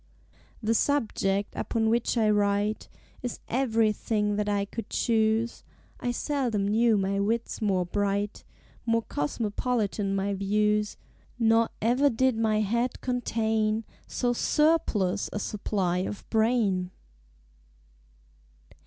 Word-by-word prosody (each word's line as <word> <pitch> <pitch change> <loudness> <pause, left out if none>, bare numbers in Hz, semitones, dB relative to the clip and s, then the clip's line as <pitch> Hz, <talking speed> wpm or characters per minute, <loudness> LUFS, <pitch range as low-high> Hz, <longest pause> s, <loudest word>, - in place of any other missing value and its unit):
The 220 +1 +2
Subject 210 -7 0
upon 225 -1 0
which 235 +2 +1
I 220 -2 +3
write 205 +1 +1 0.3
Is 245 -2 -4
everything 220 -4 +1
that 210 0 -1
I 200 -1 +1
could 230 +3 -7
choose; 225 0 +1 0.4
I 245 - -2
seldom 245 -6 -1
knew 225 +1 +3
my 195 0 0
Wits 225 +4 -1
more 190 -4 +1
bright, 200 +2 -1 0.4
More 230 -1 +1
cosmopolitan 205 - -1
my 195 +1 0
Views; 210 +2 +1 0.4
Nor 225 -1 +3
ever 250 +5 +4
did 260 0 +2
my 220 -1 +1
Head 235 +4 0
contain 225 -3 0 0.2
So 245 -1 0
surplus 235 - +1
a - - -4
supply 195 -4 -1
of 195 +2 -5
Brain! 220 -5 +2
215 Hz, 110 wpm, -27 LUFS, 200-235 Hz, 0.4 s, ever